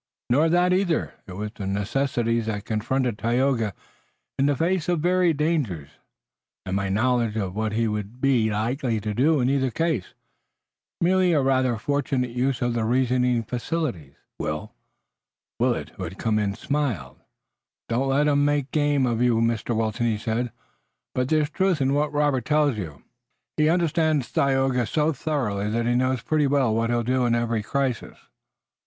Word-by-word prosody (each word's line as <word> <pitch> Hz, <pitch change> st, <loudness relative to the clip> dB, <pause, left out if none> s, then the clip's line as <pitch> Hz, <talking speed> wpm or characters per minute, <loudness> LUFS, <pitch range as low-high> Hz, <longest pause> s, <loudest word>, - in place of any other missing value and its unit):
"Nor 150 Hz, +6 st, +4 dB
that 180 Hz, +2 st, +3 dB
either. 185 Hz, -3 st, 0 dB
It 95 Hz, -, -8 dB
was 105 Hz, +2 st, -4 dB
the 100 Hz, -4 st, -6 dB
necessities 115 Hz, +3 st, 0 dB
that 105 Hz, -2 st, -3 dB
confronted 115 Hz, +1 st, -1 dB
Tayoga 120 Hz, -3 st, +1 dB, 0.6 s
in 135 Hz, -, +3 dB
the 145 Hz, -, +2 dB
face 170 Hz, +3 st, 0 dB
of 175 Hz, -2 st, +1 dB
varied 175 Hz, -2 st, +2 dB
dangers, 140 Hz, -, -1 dB, 0.8 s
and 95 Hz, 0 st, -2 dB
my 100 Hz, 0 st, -1 dB
knowledge 115 Hz, +1 st, +1 dB
of 95 Hz, -3 st, -3 dB
what 110 Hz, 0 st, -1 dB
he 115 Hz, +1 st, +1 dB
would 105 Hz, +2 st, -4 dB
be 125 Hz, -5 st, +2 dB
likely 115 Hz, +3 st, -1 dB
to 105 Hz, +1 st, -3 dB
do 145 Hz, +7 st, +3 dB
in 125 Hz, -, +2 dB
either 135 Hz, -1 st, +1 dB
case. 160 Hz, -, -2 dB, 0.9 s
Merely 180 Hz, 0 st, +3 dB
a 150 Hz, -, +3 dB
rather 130 Hz, -3 st, +2 dB
fortunate 130 Hz, 0 st, -1 dB
use 130 Hz, +1 st, -1 dB
of 120 Hz, -1 st, 0 dB
the 115 Hz, -1 st, -1 dB
reasoning 125 Hz, 0 st, +1 dB
faculties, 120 Hz, -, -3 dB, 0.2 s
Will." 75 Hz, 0 st, -4 dB, 0.9 s
Willet, -, -, 0 dB
who -, -, -9 dB
had 90 Hz, +4 st, -8 dB
come 110 Hz, -2 st, 0 dB
in, 100 Hz, -1 st, -1 dB
smiled. 110 Hz, -, -2 dB, 0.7 s
"Don't 125 Hz, +4 st, 0 dB
let 145 Hz, +2 st, +2 dB
'em 145 Hz, -1 st, +3 dB
make 145 Hz, -2 st, 0 dB
game 145 Hz, -3 st, +2 dB
of 120 Hz, -1 st, 0 dB
you, 125 Hz, -2 st, +3 dB
Mr. 115 Hz, 0 st, 0 dB
Wilton," 115 Hz, +1 st, 0 dB
he 110 Hz, -2 st, 0 dB
said, 115 Hz, +2 st, -2 dB, 0.6 s
"but 125 Hz, 0 st, -1 dB
there's 155 Hz, -1 st, +2 dB
truth 190 Hz, -3 st, +1 dB
in 135 Hz, 0 st, +1 dB
what 145 Hz, +1 st, +1 dB
Robert 145 Hz, -4 st, +1 dB
tells 150 Hz, -2 st, +2 dB
you. 80 Hz, -9 st, -7 dB, 0.5 s
He 155 Hz, 0 st, +3 dB
understands 160 Hz, -5 st, +1 dB
Tayoga 135 Hz, -3 st, +1 dB
so 155 Hz, +3 st, +1 dB
thoroughly 115 Hz, -9 st, -2 dB
that 115 Hz, +2 st, -1 dB
he 120 Hz, -, +2 dB
knows 130 Hz, -1 st, +1 dB
pretty 155 Hz, -2 st, +1 dB
well 135 Hz, -5 st, +2 dB
what 115 Hz, +1 st, 0 dB
he'll 120 Hz, 0 st, +1 dB
do 125 Hz, +1 st, +1 dB
in 120 Hz, -, +2 dB
every 115 Hz, -1 st, 0 dB
crisis." 130 Hz, +2 st, -2 dB
125 Hz, 170 wpm, -24 LUFS, 110-145 Hz, 0.9 s, Nor